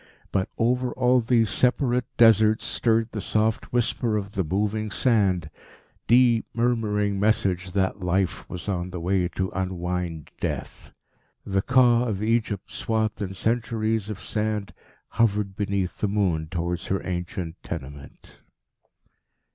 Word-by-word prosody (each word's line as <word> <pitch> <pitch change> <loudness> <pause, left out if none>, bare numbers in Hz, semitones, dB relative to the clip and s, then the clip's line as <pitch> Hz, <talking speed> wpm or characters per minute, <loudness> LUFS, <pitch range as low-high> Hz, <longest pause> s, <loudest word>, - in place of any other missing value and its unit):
But 95 -1 0
over 125 +2 +1
all 125 0 +3
these 115 -3 +2
separate 125 +2 +1
Deserts 110 -2 +5
stirred 115 -1 +1
the 105 - -4
soft 110 +2 0
whisper 120 -2 0
of 100 -1 -4
the 95 - 0
moving 105 +5 -1
sand 95 - +1 0.6
deep 120 -1 +4
murmuring 105 -4 +1
message 95 -4 +1
that 95 0 0
Life 90 +1 -1
was 90 +2 -7
on 90 -2 -2
the 90 -1 -6
way 90 +1 +1
to 95 +2 -3
unwind 90 -4 -3
Death. - - -5 0.5
The 95 0 0
Ka 125 0 +4
of 105 -3 -2
Egypt, 110 -3 -1
swathed 110 -1 -1
in 95 -1 -4
centuries 110 0 -1
of 105 -3 -5
sand, 105 -2 -2 0.3
hovered 105 -4 +1
beneath 100 -2 -2
the 105 - +1
moon 95 -6 0
towards 85 0 -3
her 95 - -2
ancient 90 -2 -4
tenement. 70 -3 -9
105 Hz, 130 wpm, -25 LUFS, 95-115 Hz, 0.6 s, Deserts